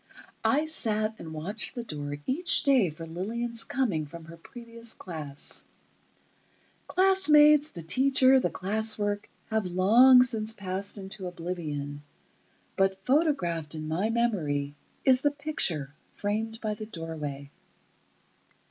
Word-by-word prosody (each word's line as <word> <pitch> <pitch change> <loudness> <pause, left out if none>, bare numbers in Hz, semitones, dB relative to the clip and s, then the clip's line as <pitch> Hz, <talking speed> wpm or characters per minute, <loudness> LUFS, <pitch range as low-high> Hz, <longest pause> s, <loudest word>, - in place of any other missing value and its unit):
I 295 +3 +2
sat 220 -8 0
and 160 - -8
watched 180 +8 +1
the 240 - -4
door 145 -8 -5
each 345 +8 +3
day 260 -10 +4
for 160 +2 -9
Lillian's 225 +8 -3
coming 195 - -1
from 165 +2 -11
her 165 0 -11
previous 230 +4 -9
class. 150 -6 -6 1.2
Classmates, 305 -6 +5
the 170 - -9
teacher, 260 - +4
the - - 0
class 215 +4 -1
work, 205 -1 -2 0.2
have 220 -3 0
long 235 +8 +6
since 225 -3 0
passed 195 0 -4
into 195 -1 -7
oblivion, 155 -5 -5 0.7
but 195 0 0
photographed 180 - 0
in 155 0 -6
my 180 +8 -1
memory 165 -12 -1 0.3
is 260 -1 +5
the 290 - +3
picture, 275 - -1 0.2
framed 220 +2 -3
by 215 -1 -2
the 215 0 -8
doorway. 150 -7 -7
205 Hz, 125 wpm, -28 LUFS, 165-245 Hz, 1.2 s, long